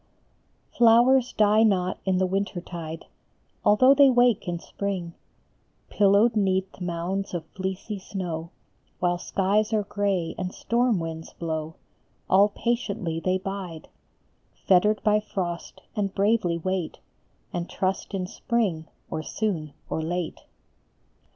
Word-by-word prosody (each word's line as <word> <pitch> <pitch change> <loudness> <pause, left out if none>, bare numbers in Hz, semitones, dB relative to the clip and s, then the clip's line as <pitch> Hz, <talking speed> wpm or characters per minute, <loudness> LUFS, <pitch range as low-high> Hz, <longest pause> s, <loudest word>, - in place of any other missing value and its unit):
LOWERS 245 +2 +6
die 215 0 +4
not 190 -4 +2
in 190 -1 +2
the 185 - +2
winter 190 0 -1
tide, 165 -2 -7 0.6
Although 255 +6 +6
they 280 -1 +7
wake 245 -5 +3
in 175 -1 -1
spring; 180 -1 -4 0.8
Pillowed 205 +3 +4
neath 190 -2 0
mounds 180 +2 -3
of 165 -2 -4
fleecy 190 +2 -4
snow, 175 -4 -5 0.5
While 175 -1 +1
skies 205 +5 +1
are 215 -1 +2
gray 200 -4 -1
and 185 0 -4
storm 235 -3 +1
winds 160 -1 -6
blow, 160 -1 -4 0.5
All 200 +2 +5
patiently 210 -7 -2
they 185 +2 +1
bide, 185 -4 -6 0.8
Fettered 210 +3 +4
by 210 0 +4
frost, 175 -5 -5
and 200 -3 -2
bravely 200 -4 +2
wait, 185 0 -2 0.6
And 175 0 -3
trust 190 +1 -2
in 185 -1 -2
spring 195 -5 -1 0.2
or 155 - -2
soon 160 -5 -3
or 160 - -2
late. 170 +1 -3
190 Hz, 125 wpm, -26 LUFS, 175-210 Hz, 0.8 s, they